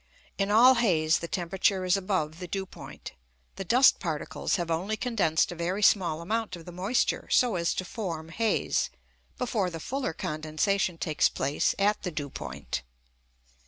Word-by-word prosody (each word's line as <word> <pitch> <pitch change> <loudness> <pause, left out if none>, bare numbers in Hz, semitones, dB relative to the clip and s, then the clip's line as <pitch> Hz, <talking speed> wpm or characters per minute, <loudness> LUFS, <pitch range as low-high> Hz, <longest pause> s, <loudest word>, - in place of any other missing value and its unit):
In 195 0 +1
all 235 +5 +7
haze 170 -10 +2
the 170 - -5
temperature 185 +2 0
is 180 +1 +3
above 185 -5 -1
the 180 - -6
dew 195 +2 -3
point. - - -10 0.4
The - - -5
dust 250 +8 +5
particles 160 -5 -2
have 175 -3 -2
only 190 +7 -1
condensed 205 -11 +1
a - - -6
very 180 +5 -2
small 170 -6 +3
amount 220 +1 -2
of 165 -2 -12
the 175 - -8
moisture 195 +9 0
so 245 -5 +3
as 170 -1 +1
to 185 - -3
form 170 -6 -5
haze, 225 +5 0 0.5
before 220 -7 0
the 165 -2 -7
fuller 260 - -3
condensation 160 +5 -1
takes 155 -2 +2
place 140 +2 0
at 205 +1 +2
the 180 - -3
dew 145 -4 -5
point. 65 -1 -5
180 Hz, 165 wpm, -28 LUFS, 160-205 Hz, 0.5 s, all